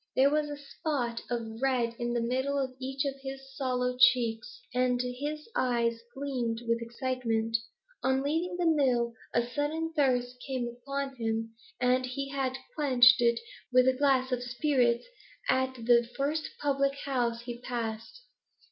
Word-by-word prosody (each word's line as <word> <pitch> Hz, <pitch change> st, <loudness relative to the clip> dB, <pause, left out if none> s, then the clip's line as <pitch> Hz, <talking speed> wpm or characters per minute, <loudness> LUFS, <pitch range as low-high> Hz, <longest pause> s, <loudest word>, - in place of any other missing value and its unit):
There 275 Hz, +2 st, +5 dB
was 300 Hz, 0 st, +1 dB
a 290 Hz, -, -5 dB
spot 275 Hz, -5 st, -3 dB
of 230 Hz, -1 st, -4 dB
red 250 Hz, -3 st, +1 dB
in 240 Hz, 0 st, -1 dB
the 240 Hz, -, +1 dB
midst 255 Hz, +4 st, 0 dB
of 275 Hz, -2 st, -1 dB
each 265 Hz, +1 st, -2 dB
of 275 Hz, -1 st, -3 dB
his 270 Hz, 0 st, -8 dB
sallow 250 Hz, -2 st, -1 dB
cheeks, 255 Hz, -, +3 dB
and 250 Hz, 0 st, +2 dB
his 285 Hz, +5 st, -3 dB
eyes 235 Hz, -2 st, +1 dB
gleamed 245 Hz, -4 st, -2 dB
with 230 Hz, 0 st, +1 dB
excitement. 230 Hz, -2 st, -1 dB, 0.5 s
On 265 Hz, +1 st, +1 dB
leaving 330 Hz, +5 st, -1 dB
the 355 Hz, -, 0 dB
mill 255 Hz, -7 st, +3 dB, 0.2 s
a 235 Hz, 0 st, +1 dB
sudden 310 Hz, +5 st, -2 dB
thirst 250 Hz, -4 st, +1 dB
had 265 Hz, -, -2 dB
come 240 Hz, -, -1 dB
upon 270 Hz, +3 st, -5 dB
him, 225 Hz, -1 st, -2 dB, 0.3 s
and 250 Hz, +1 st, +2 dB
he 275 Hz, +2 st, -4 dB
had 265 Hz, -1 st, -1 dB, 0.2 s
quenched 255 Hz, -5 st, +6 dB
it 235 Hz, -1 st, +3 dB, 0.3 s
with 255 Hz, 0 st, +5 dB
a 260 Hz, -, +5 dB
glass 260 Hz, -1 st, +2 dB
of 250 Hz, -1 st, 0 dB
spirits 245 Hz, -1 st, +1 dB, 0.4 s
at 260 Hz, 0 st, +2 dB
the 235 Hz, 0 st, +3 dB
first 295 Hz, +3 st, -1 dB
public 275 Hz, -1 st, +1 dB
house 240 Hz, -4 st, 0 dB
he 240 Hz, 0 st, -7 dB
passed. 230 Hz, -, -5 dB
255 Hz, 155 wpm, -30 LUFS, 240-275 Hz, 0.5 s, quenched